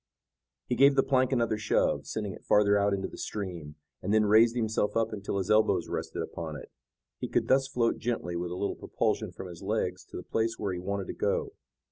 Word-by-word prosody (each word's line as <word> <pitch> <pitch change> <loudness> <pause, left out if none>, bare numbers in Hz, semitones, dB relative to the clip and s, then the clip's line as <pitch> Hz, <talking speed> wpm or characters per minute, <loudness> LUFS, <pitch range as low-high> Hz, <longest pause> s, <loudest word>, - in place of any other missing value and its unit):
He - - -2
gave 140 +3 +5
the 135 - +4
plank 130 -1 +2
another 115 -4 +1
shove, 110 - +1
sending 105 -3 -3
it - - -13
farther 105 0 +4
out 100 0 +3
into 95 -1 -1
the - - -11
stream, 85 -8 -5 0.3
and 95 - -2
then 110 0 +4
raised 115 +3 +5
himself 110 -2 0
up 115 -1 0
until 100 -1 -3
his 95 +2 -1
elbows 110 0 +3
rested - - -3
upon 80 -2 -6
it. 75 - -10 0.5
He - - -3
could - - 0
thus 135 0 +3
float 125 -4 0
gently 110 -7 -2
with 85 +1 -2
a 90 - -5
little 100 - -1
propulsion - - -1
from - - -8
his 85 -2 -9
legs 95 -3 -2
to - - -9
the 90 - -6
place 115 0 -1
where 100 -3 -2
he 90 - -4
wanted 100 +1 -3
to - - -5
go. - - -1
105 Hz, 220 wpm, -29 LUFS, 95-115 Hz, 0.5 s, gave